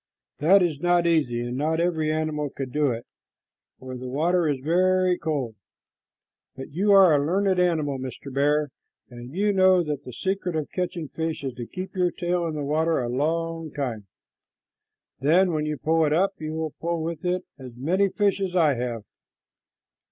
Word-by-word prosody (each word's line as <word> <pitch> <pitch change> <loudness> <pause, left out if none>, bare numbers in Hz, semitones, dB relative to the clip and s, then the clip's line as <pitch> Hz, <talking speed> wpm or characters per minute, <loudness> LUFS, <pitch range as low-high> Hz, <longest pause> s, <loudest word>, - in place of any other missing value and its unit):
That 180 +6 +5
is 160 -5 -1
not 175 +1 +2
easy, 145 -8 +1
and 120 +1 -4
not 155 +4 0
every 160 -3 +1
animal 155 -2 -1
could 135 -1 -6
do 150 0 +2
it, 115 -1 -4 0.7
for 130 0 -8
the 125 0 -7
water 165 +4 +1
is 140 -2 -1
very 185 +4 +2
cold; 145 -9 -3 1.0
but 135 +3 -8
you 195 +7 +1
are 190 -4 +7
a 145 -1 +3
learned 190 +4 +1
animal, 155 -6 +1
Mr. 130 +1 -7
Bear, 145 +1 +1 0.4
and 120 +1 -10
you 205 +5 +1
know 185 -2 +5
that 150 -3 -4
the 125 - -9
secret 185 +5 -2
of 155 -2 -3
catching 175 -3 -3
fish 160 -2 -4
is 135 -2 -3
to 120 -1 -7
keep 185 +1 -7
your 180 -1 +2
tail 175 -1 -1
in 160 - -4
the 150 - -3
water 160 +3 +1
a 120 -2 -2
long 165 +4 -1
time. 115 -8 -4 1.1
Then 175 +7 +3
when 155 -1 -1
you 150 -1 -2
pull 160 +2 +2
it 150 -1 +2
up, 195 +5 +2
you 155 0 -4
will 160 -1 -3
pull 170 -1 -1
with 165 +2 -4
it 180 0 0 0.2
as 125 -3 -10
many 185 +9 +1
fish 200 0 +1
as 185 -2 -2
I 160 -5 +4
have." 120 -3 -4
160 Hz, 185 wpm, -25 LUFS, 140-180 Hz, 1.1 s, are